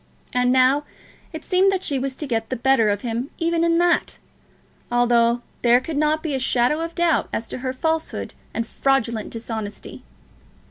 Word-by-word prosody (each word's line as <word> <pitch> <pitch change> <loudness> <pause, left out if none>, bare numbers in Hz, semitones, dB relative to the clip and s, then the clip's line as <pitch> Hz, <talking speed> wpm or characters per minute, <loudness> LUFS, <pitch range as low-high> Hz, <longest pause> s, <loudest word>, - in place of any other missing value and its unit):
And 250 0 +2
now 260 +3 +4 0.5
it 315 - -8
seemed 380 +1 +3
that 380 -1 -2
she 275 -2 0
was 265 0 -3
to 300 - -5
get 225 -4 -2
the 255 - -1
better 240 -3 +3
of 205 -1 -1
him 240 +3 -3
even 335 0 +1
in 335 0 +3
that, 345 0 +1 0.7
although 240 0 +3 0.2
there 240 0 +5
could 295 +4 -6
not 305 +1 +1
be 315 -3 -2
a 265 - 0
shadow 255 +3 +1
of 330 0 -5
doubt 345 -2 +1
as 225 - -3
to - - -5
her 255 0 -2
falsehood 320 +5 -2 0.2
and 230 - -2
fraudulent 235 -4 0
dishonesty! 220 -2 -6
260 Hz, 180 wpm, -22 LUFS, 235-320 Hz, 0.7 s, there